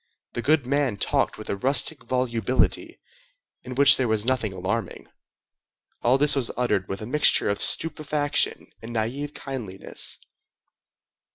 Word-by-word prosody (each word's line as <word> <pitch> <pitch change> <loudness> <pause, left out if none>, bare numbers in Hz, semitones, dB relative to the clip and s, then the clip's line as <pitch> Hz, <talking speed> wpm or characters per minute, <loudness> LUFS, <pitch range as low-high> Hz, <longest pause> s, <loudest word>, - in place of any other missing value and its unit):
The 120 - -4
goodman 140 -4 0
talked - - -1
with - - -10
a - - -2
rustic 135 +7 0
volubility, 125 -1 -1 0.6
in 125 0 -9
which 140 +1 +7
there 130 - -1
was 110 -1 0
nothing 125 -5 -1
alarming. 95 +5 -5 1.0
All 125 +3 +2
this 145 +1 +3
was 130 -4 0
uttered 105 -6 -1
with 95 +2 -6
a - - -6
mixture 140 -4 +3
of 100 - -4
stupefaction 150 -2 +3 0.2
and 115 +1 -9
naïve 135 +7 -4
kindliness. 115 -9 -3
125 Hz, 130 wpm, -24 LUFS, 110-140 Hz, 1.0 s, which